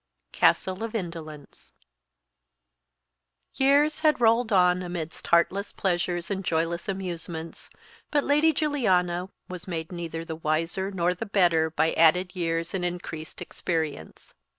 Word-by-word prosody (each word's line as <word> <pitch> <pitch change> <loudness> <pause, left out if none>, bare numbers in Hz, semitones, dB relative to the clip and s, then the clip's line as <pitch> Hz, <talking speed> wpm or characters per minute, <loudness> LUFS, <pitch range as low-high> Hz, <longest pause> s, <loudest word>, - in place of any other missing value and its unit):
Castle 185 +3 +2
of 225 0 -5
Indolence. 165 -7 -7 1.8
YEARS 285 +3 +3
had 310 -3 +3
rolled 230 0 +3
on 180 -2 +4
amidst 175 -3 -6
heartless 185 +4 +2
pleasures 175 -1 -1
and 195 -1 -2
joyless 170 +1 -1
amusements, 170 -4 -5 0.4
but 290 -1 +1
Lady 300 +3 +4
Juliana 190 - +1 0.2
was 180 0 -7
made 165 -2 -4
neither 165 -2 -5
the 160 - -5
wiser 165 +5 -1
nor 180 -2 0
the 190 +5 -6
better 170 -5 +3
by 160 0 +1
added 180 +4 +4
years 165 -1 -2
and 190 -2 -2
increased 175 -3 -5
experience. 160 - -4
180 Hz, 125 wpm, -26 LUFS, 165-195 Hz, 1.8 s, on